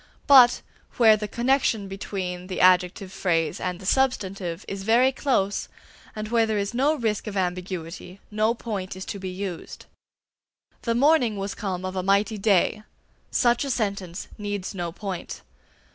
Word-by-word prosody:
But, 255 Hz, -4 st, +7 dB, 0.3 s
where 225 Hz, -3 st, +7 dB
the 210 Hz, 0 st, -4 dB
connexion 235 Hz, -4 st, +1 dB
between 185 Hz, -2 st, -5 dB
the 185 Hz, -, -4 dB
adjective 185 Hz, +1 st, +3 dB
phrase 170 Hz, -3 st, 0 dB
and 180 Hz, -1 st, -3 dB
the 190 Hz, -, -11 dB
substantive 195 Hz, -7 st, 0 dB
is 195 Hz, 0 st, -5 dB
very 235 Hz, +6 st, +4 dB
close, 240 Hz, -8 st, 0 dB, 0.5 s
and 215 Hz, 0 st, -5 dB
where 230 Hz, -1 st, +3 dB
there 215 Hz, -1 st, 0 dB
is 200 Hz, +2 st, -2 dB
no 280 Hz, +6 st, +2 dB
risk 220 Hz, -6 st, -2 dB
of 205 Hz, -1 st, -4 dB
ambiguity, 180 Hz, 0 st, -4 dB
no 215 Hz, +2 st, +1 dB
point 200 Hz, -6 st, -5 dB
is 185 Hz, -, -7 dB
to 200 Hz, -, -6 dB
be 190 Hz, -1 st, -5 dB
used. 185 Hz, -2 st, -6 dB, 1.0 s
"The 230 Hz, -1 st, -1 dB
morning 255 Hz, -5 st, +3 dB
was 195 Hz, +1 st, -3 dB
come 185 Hz, -3 st, -4 dB
of 185 Hz, 0 st, -4 dB
a 185 Hz, -, 0 dB
mighty 200 Hz, +3 st, +1 dB
day" 200 Hz, 0 st, +2 dB, 0.5 s
such 240 Hz, +1 st, +2 dB
a 280 Hz, -, -4 dB
sentence 200 Hz, -7 st, -3 dB
needs 205 Hz, -2 st, -4 dB
no 175 Hz, -3 st, -4 dB
point. 190 Hz, 0 st, -6 dB
200 Hz, 160 wpm, -25 LUFS, 185-230 Hz, 1.0 s, But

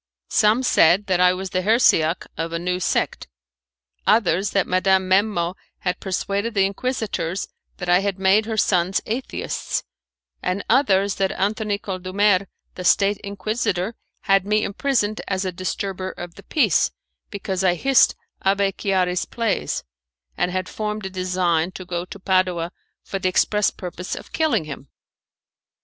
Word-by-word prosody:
Some 220 Hz, +4 st, +4 dB
said 185 Hz, -4 st, +4 dB
that 185 Hz, -3 st, +1 dB
I 180 Hz, 0 st, +6 dB
was 185 Hz, 0 st, -5 dB
the 185 Hz, -, 0 dB
heresiarch 185 Hz, -6 st, +3 dB
of 165 Hz, 0 st, -3 dB
a 170 Hz, -, -1 dB
new 180 Hz, +1 st, -1 dB
sect; 185 Hz, -, -1 dB, 0.8 s
others 205 Hz, -3 st, +3 dB
that 195 Hz, -, +1 dB
Madame 190 Hz, 0 st, +2 dB
Memmo 185 Hz, -3 st, +2 dB, 0.3 s
had 180 Hz, -1 st, -1 dB
persuaded 200 Hz, +3 st, -2 dB
the 195 Hz, -1 st, +4 dB
Inquisitors 200 Hz, -4 st, -2 dB, 0.3 s
that 180 Hz, -, -6 dB
I 175 Hz, +1 st, +5 dB
had 195 Hz, -1 st, -1 dB
made 195 Hz, +3 st, +3 dB
her 220 Hz, -1 st, -2 dB
sons 185 Hz, -2 st, +2 dB
Atheists, 240 Hz, +4 st, -3 dB, 0.6 s
and 185 Hz, +2 st, -2 dB
others 200 Hz, -6 st, +3 dB
that 195 Hz, -1 st, +1 dB
Antony 205 Hz, +1 st, -1 dB
Condulmer, 195 Hz, 0 st, +1 dB, 0.3 s
the 180 Hz, -, -7 dB
State 200 Hz, +3 st, +3 dB
Inquisitor, 200 Hz, -1 st, -2 dB, 0.3 s
had 195 Hz, -1 st, +3 dB
me 210 Hz, +2 st, +1 dB
imprisoned 215 Hz, -2 st, 0 dB
as 190 Hz, -1 st, -1 dB
a 185 Hz, -, -1 dB
disturber 185 Hz, +1 st, -3 dB
of 175 Hz, -1 st, -8 dB
the -, -, -13 dB
peace, 310 Hz, -, +2 dB, 0.4 s
because 190 Hz, -2 st, -3 dB
I 180 Hz, -2 st, +3 dB
hissed 270 Hz, +7 st, +4 dB, 0.3 s
Abbé 195 Hz, 0 st, +2 dB
Chiari's 185 Hz, -2 st, 0 dB
plays, 230 Hz, -4 st, -2 dB, 0.5 s
and 180 Hz, -, 0 dB
had 185 Hz, 0 st, -2 dB
formed 210 Hz, -1 st, -4 dB
a 190 Hz, -, -5 dB
design 180 Hz, -2 st, 0 dB
to 185 Hz, -, -8 dB
go 175 Hz, 0 st, -3 dB
to 190 Hz, -, -10 dB
Padua 185 Hz, -3 st, +1 dB, 0.3 s
for 195 Hz, -, -4 dB
the 185 Hz, -1 st, +1 dB
express 210 Hz, +2 st, +2 dB
purpose 180 Hz, -1 st, -6 dB
of -, -, -11 dB
killing 300 Hz, -, +1 dB
him. 145 Hz, -2 st, -8 dB
190 Hz, 150 wpm, -22 LUFS, 180-205 Hz, 0.8 s, I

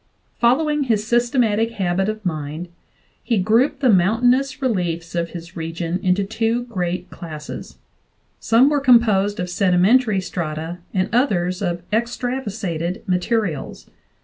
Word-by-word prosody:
Following 295 Hz, +4 st, +2 dB
his 215 Hz, -4 st, 0 dB
systematic 235 Hz, -1 st, +1 dB
habit 190 Hz, -1 st, 0 dB
of 215 Hz, -1 st, -5 dB
mind, 155 Hz, +1 st, -4 dB, 0.5 s
he 230 Hz, -, 0 dB
grouped 235 Hz, +9 st, +2 dB
the 260 Hz, -, +4 dB
mountainous 245 Hz, +8 st, +2 dB
reliefs 175 Hz, -, -2 dB
of 170 Hz, -1 st, -1 dB
his 170 Hz, 0 st, -9 dB
region 165 Hz, +2 st, -3 dB
into 185 Hz, +2 st, +2 dB
two 225 Hz, +3 st, -1 dB
great 180 Hz, -7 st, -4 dB
classes; 155 Hz, -3 st, -8 dB, 0.6 s
some 235 Hz, +4 st, +4 dB
were 295 Hz, -, +2 dB
composed 215 Hz, -6 st, +4 dB
of 180 Hz, -, -2 dB
sedimentary 195 Hz, +5 st, +3 dB
strata 165 Hz, -1 st, -4 dB
and 185 Hz, -1 st, 0 dB
others 185 Hz, -8 st, +1 dB
of 175 Hz, -2 st, -3 dB
extrav 245 Hz, +3 st, -1 dB
asated 180 Hz, -4 st, -4 dB
materials. 180 Hz, -, -2 dB
200 Hz, 125 wpm, -21 LUFS, 175-235 Hz, 0.6 s, the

